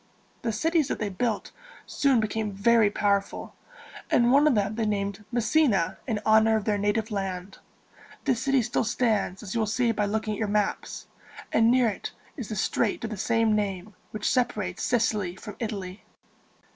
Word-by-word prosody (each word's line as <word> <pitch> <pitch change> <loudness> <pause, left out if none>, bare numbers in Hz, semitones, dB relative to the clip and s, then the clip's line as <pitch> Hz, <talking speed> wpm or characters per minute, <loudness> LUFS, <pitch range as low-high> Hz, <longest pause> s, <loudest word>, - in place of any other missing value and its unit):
The 230 - -1
cities 315 +7 +1
that - - -2
they 210 - -2
built 210 +3 -2 0.3
soon 275 -4 +2
became 215 0 -2
very 220 +2 +4
powerful, 200 -1 -1 0.6
and 240 0 +4
one 285 +3 +5
of 285 - +3
them 205 0 0
they 220 -1 -1
named 200 0 -2
Mes 235 -2 0
si´na 215 - +2
in 220 -4 -1
honor 220 0 +5
of 215 -2 -1
their 210 -2 +1
native 210 +2 0
land. 190 -1 -4 0.6
This 255 -4 0
city 270 -2 +2
still 235 - 0
stands, 215 -4 0
as 190 - -6
you 230 - 0
will 220 - +1
see 235 +2 +1
by 210 -2 0
looking 215 +1 -1
at - - -5
your 220 - 0
maps; 205 0 -2 0.5
and 225 +1 +4
near 250 0 +4
it 210 - -4 0.2
is 250 -8 -6
the 215 - -3
strait 210 +3 0
of 225 - -3
the - - -3
same 225 +1 +1
name, 200 -1 -3 0.2
which 215 -1 -3
separates 215 -7 0
Sicily 215 -6 0
from 210 +2 -9
Italy. 200 -5 -5
215 Hz, 185 wpm, -26 LUFS, 205-235 Hz, 0.6 s, one